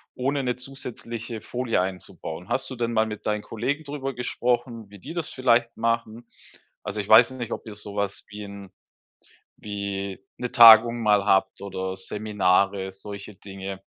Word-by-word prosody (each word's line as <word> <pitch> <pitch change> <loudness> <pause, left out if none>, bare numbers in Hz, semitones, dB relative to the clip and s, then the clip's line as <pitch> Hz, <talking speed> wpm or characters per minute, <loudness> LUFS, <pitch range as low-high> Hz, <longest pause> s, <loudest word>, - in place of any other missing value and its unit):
ohne 135 +2 -1
'ne 125 -1 0
zusätzliche 120 -3 -7
Folie 120 -6 -1
einzubauen. 90 -2 -5
Hast 130 - -1
du 130 - -6
denn 120 -1 -2
mal 110 0 +3
mit 105 -1 -7
deinen 105 0 0
Kollegen 130 +9 -3
drüber 140 -2 -4
gesprochen, 120 -3 -2
wie 100 -1 -13
die 150 - -8
das 170 -3 -3
vielleicht 120 -2 +2
machen? 115 0 -1 0.6
Also, 105 - -3
ich 100 - -10
weiß 115 +3 +8
nicht, 120 -3 -6
ob - - -5
ihr 105 - -8
sowas 100 -1 -4
wie 105 0 -8
'n 100 -1 -10 0.9
wie 100 -2 -4 0.2
'ne 125 - -4
Tagung 115 -1 +9
mal 105 -2 +3
habt 95 -1 +2
oder 95 -1 -4
Seminare, 100 -1 +1
solche 100 +1 -9
Dinge. 95 0 -8
110 Hz, 160 wpm, -25 LUFS, 100-120 Hz, 0.9 s, Tagung